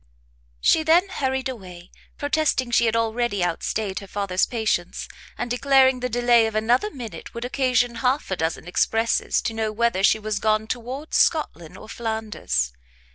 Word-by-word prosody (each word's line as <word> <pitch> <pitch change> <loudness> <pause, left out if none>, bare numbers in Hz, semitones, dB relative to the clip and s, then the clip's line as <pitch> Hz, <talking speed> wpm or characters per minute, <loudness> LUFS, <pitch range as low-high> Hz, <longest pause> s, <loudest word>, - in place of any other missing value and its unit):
She 315 - +4
then 335 +5 +3
hurried 265 -6 -2
away, 180 -8 -9 0.3
protesting 285 -4 0
she 235 -1 +3
had 225 - +1
already 230 -4 0
outstayed 190 +3 -2
her 200 - -11
father's 190 -1 0
patience, 220 -7 -2 0.3
and 240 - -4
declaring 265 0 +4
the 250 0 -2
delay 240 -1 +4
of 220 - -6
another 240 - +2
minute 240 - -9
would 235 +1 -4
occasion 250 -2 +1
half 260 -2 0
a - - +1
dozen 160 0 -3
expresses 225 +5 +1
to 225 - -2
know 220 -1 -2
whether 230 -3 0
she 200 - +4
was 215 -1 -3
gone 215 +1 +1
towards 255 +6 -4
Scotland 175 - 0
or - - -12
Flanders. 220 - -2
230 Hz, 160 wpm, -23 LUFS, 210-255 Hz, 0.3 s, She